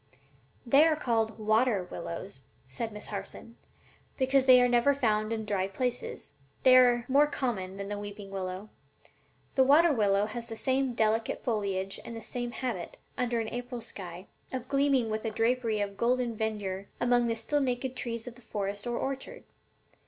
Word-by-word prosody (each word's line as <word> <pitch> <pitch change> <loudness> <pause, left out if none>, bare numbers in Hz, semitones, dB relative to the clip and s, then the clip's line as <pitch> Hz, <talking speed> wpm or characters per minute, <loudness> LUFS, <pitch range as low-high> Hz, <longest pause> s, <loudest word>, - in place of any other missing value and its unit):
"They 275 +6 +6
are 315 - +3
called 225 -6 0
water 215 -1 +2
willows," 175 -2 -7 0.3
said 225 - -4
Miss 210 0 -8
Harson, 215 +3 -7 0.6
"because 265 0 +3
they 255 -1 +8
are 245 - +5
never 245 +3 +3
found 215 -5 +1
in 220 -1 -2
dry 195 -2 0
places. 245 +5 -4 0.3
They 255 -1 +8
are 245 -2 +5
more 285 +3 +5
common 195 -10 -3
than 200 0 -5
the 205 0 -4
weeping 205 -1 -8
willow. 190 +1 -5 0.8
The 265 - +5
water 300 +4 +6
willow 205 -4 +2
has 235 +2 -6
the 225 - -6
same 260 +1 0
delicate 220 0 0
foliage 195 -4 -1
and 230 - -7
the 225 - -8
same 245 -1 -4
habit, 235 -7 -4 0.2
under 240 -2 0
an 220 -1 -2
April 245 0 -5
sky, 185 -5 -8 0.3
of 255 -1 -4
gleaming 275 -4 +2
with 215 0 -2
a 225 - -1
drapery 225 -1 +1
of 200 -1 -3
golden 245 -1 +1
verdure 205 -3 -3
among 245 0 +3
the 230 - 0
still 260 +6 0
naked 255 0 -1
trees 230 -3 -4
of 245 - -7
the 245 - -18
forest 205 -1 -4
or 240 0 -1
orchard. 275 - -4
230 Hz, 175 wpm, -29 LUFS, 205-250 Hz, 0.8 s, they